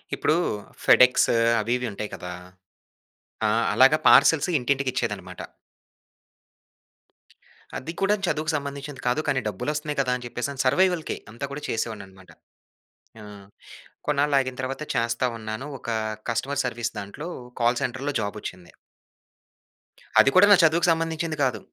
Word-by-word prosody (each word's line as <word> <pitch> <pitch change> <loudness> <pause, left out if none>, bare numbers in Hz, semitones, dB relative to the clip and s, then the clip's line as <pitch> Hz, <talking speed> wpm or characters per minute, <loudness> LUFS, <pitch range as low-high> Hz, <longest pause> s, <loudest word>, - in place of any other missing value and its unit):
ఇప్పుడూ 155 - +1 0.5
ఫెడ్‌ఎక్స్ 125 0 +5 0.3
అవి 115 +3 -1
ఇవి 125 -1 -4
ఉంటాయి 105 +1 -5
కదా! 90 0 -7 1.2
ఆ! - - +2 0.2
అలాగా - - +6
పార్సెల్స్ - - +6
ఇంటింటికిచ్చేదనమాట. 130 0 -2 2.4
అది 165 - -6
కూడాను 195 0 +1
చదువుకు 155 0 -1
సంబంధించింది 140 -1 -6
కాదు, 125 +5 +1
కానీ 140 -3 +1
డబ్బులొస్తన్నయి 150 - -3
కదా 125 -2 -1
అని 125 - -10
చెప్పేసని 130 +3 -4
సర్వైవల్‌కే 175 +4 +1
అంతా 120 +5 -5
కూడా 145 +2 -6
చేసేవాడిననమాట. 95 -5 -5 0.9
ఆ! - - -11 0.8
కొన్నాళ్ళు 145 0 +2
ఆగిన 130 -1 -3
తర్వాత 135 +3 -4
చేస్తా 115 +2 0
ఉన్నాను. 110 +4 -6
ఒకా 115 -1 -3 0.4
కస్టమర్ 135 +5 -1
సర్విస్ 120 -1 -3
దాంట్లో 100 +11 -7 0.3
కాల్ 120 +1 +2
సెంటర్‌లో 135 +4 -2
జాబొచ్చింది. 100 -4 -6 1.5
అది - - +7
కూడా 185 - +8
నా - - +10
చదువుకు 165 +2 +3
సంబంధించింది 165 -1 -2
కాదు. 125 -5 0
130 Hz, 120 wpm, -24 LUFS, 115-150 Hz, 2.4 s, నా